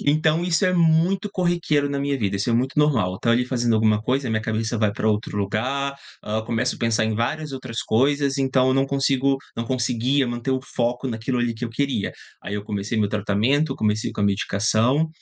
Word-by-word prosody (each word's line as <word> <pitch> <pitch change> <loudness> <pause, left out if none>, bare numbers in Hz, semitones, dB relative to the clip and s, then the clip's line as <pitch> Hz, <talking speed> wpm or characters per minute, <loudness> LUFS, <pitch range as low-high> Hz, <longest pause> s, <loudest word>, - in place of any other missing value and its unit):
Então 155 +3 +3
isso 175 +1 +1
é 185 - +3
muito 175 +4 +2
corriqueiro 175 -6 0
na 140 - -1
minha 140 0 -1
vida, 100 -4 -1
isso 100 +5 -2
é - - +2
muito 130 +5 0
normal, 115 -12 +2
estou 115 - 0
ali 120 +1 +2
fazendo 120 -2 0
alguma 110 -1 +3
coisa, 130 +2 0
a - - -2
minha 110 0 0
cabeça 110 0 -2
vai 105 -2 +2
pra 110 - -3
outro 105 -1 -1
lugar, 130 +8 -1 0.3
ah, 110 +1 -2
começo 115 0 -1
a - - -18
pensar 115 -1 +1
em 110 0 -1
várias 145 +7 -2
outras 130 -3 -5
coisas, 140 +4 +1
então 130 -1 +2
eu 130 - +3
não 135 0 +2
consigo 135 0 +1 0.2
não 115 - -3
conseguia 130 +2 +1
manter 120 +2 -3
o 130 - 0
foco 120 +2 -1
naquilo 115 +2 -2
ali 120 -1 0
que 115 +2 -5
eu 115 - -9
queria. 135 -4 -1 0.3
Aí 100 - -5
eu 105 0 -4
comecei 105 +1 -3
meu 105 - +2
tratamento, 110 +8 +1
comecei 105 0 0
com 105 - -3
a - - +3
medicação, 110 +8 +1
125 Hz, 215 wpm, -23 LUFS, 110-140 Hz, 0.3 s, Então